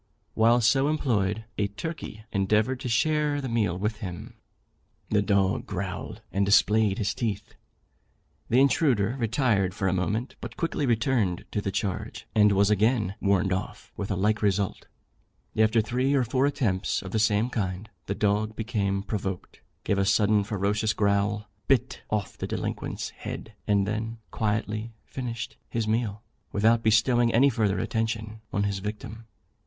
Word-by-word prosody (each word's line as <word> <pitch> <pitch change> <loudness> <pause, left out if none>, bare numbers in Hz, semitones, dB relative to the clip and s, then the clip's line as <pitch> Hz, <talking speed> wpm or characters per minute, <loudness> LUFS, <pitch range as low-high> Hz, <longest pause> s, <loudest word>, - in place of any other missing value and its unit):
While 115 +2 +4
so 135 +5 +4
employed, 110 -8 0
a 100 - +2
turkey 110 -1 -6
endeavoured 105 +5 +1
to 125 - -4
share 150 +4 +2
the 135 - -3
meal 105 -7 0
with 105 +3 -2
him. 90 -6 -7 0.8
The 105 - +4
dog 100 -2 +1
growled, - - -5
and 100 - +1
displayed 105 0 +4
his 100 - 0
teeth. 115 -6 -3 1.0
The 125 - +4
intruder 130 -6 +3
retired 110 -6 +1
for 95 - -1
a 95 - +2
moment, 105 +7 -2
but - - -7
quickly 160 -4 -1
returned 115 -6 +1
to 105 - -1
the 100 - -2
charge, 95 -1 -3
and 105 -1 +5
was 100 +1 +3
again 105 -1 +2
"warned 95 -1 +2
off," 95 - -5
with 100 - -4
a 100 - 0
like 105 +3 +1
result. 100 -1 0 0.7
After 110 +1 +4
three 125 +5 0
or 135 - +3
four 130 +3 +1
attempts 105 -9 0
of 95 - -7
the 110 - 0
same 105 +3 +2
kind, 95 -2 -2 0.2
the 100 - -1
dog 105 +1 0
became 100 -3 -1
provoked, 95 -3 -4 0.2
gave 100 - +1
a - - +3
sudden 105 +1 +3
ferocious 105 +2 0
growl, 100 0 +1 0.2
bit 135 -4 +1
off 105 -2 -2
the - - -3
delinquent's - - -4
head, 110 - -7
and 100 -2 +3
then 110 +2 -3
quietly 110 +1 -2
finished 120 -2 -5
his 115 -2 -1
meal, 110 -1 -1 0.3
without 110 +3 +3
bestowing 115 +2 +3
any 135 +5 +5
further 105 -4 +1
attention 110 +1 -2
on 100 - 0
his 100 -1 -1
victim. 110 +2 -7
110 Hz, 155 wpm, -27 LUFS, 100-115 Hz, 1.0 s, and